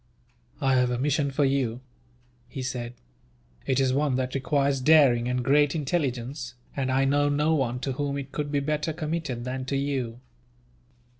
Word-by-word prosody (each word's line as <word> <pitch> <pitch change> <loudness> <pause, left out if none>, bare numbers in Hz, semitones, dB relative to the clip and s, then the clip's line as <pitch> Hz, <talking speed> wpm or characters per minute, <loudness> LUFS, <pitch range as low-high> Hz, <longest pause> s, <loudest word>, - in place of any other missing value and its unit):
"I 135 -3 +2
have 125 -1 +3
a 125 - -1
mission 140 +2 +1
for 140 +1 +1
you," 130 -4 0 0.7
he 130 +1 -5
said. 125 -1 -4 0.7
"It 130 0 +2
is 130 -1 +2
one 140 -1 +1
that 130 0 -2
requires 140 0 +1
daring 130 -5 +5
and 125 0 -1
great 145 +2 +3
intelligence, 135 -4 -2 0.2
and 130 -2 -1
I 135 +1 +2
know 145 +1 +2
no 150 +2 +2
one 125 -5 0
to 135 - -2
whom 140 +1 -2
it 140 -1 -6
could 145 -1 -3
be 145 -1 +1
better 150 +2 -1
committed 155 -6 -3
than 130 +1 -4
to 135 +1 -1
you. 130 -4 -2
135 Hz, 170 wpm, -26 LUFS, 125-145 Hz, 0.7 s, daring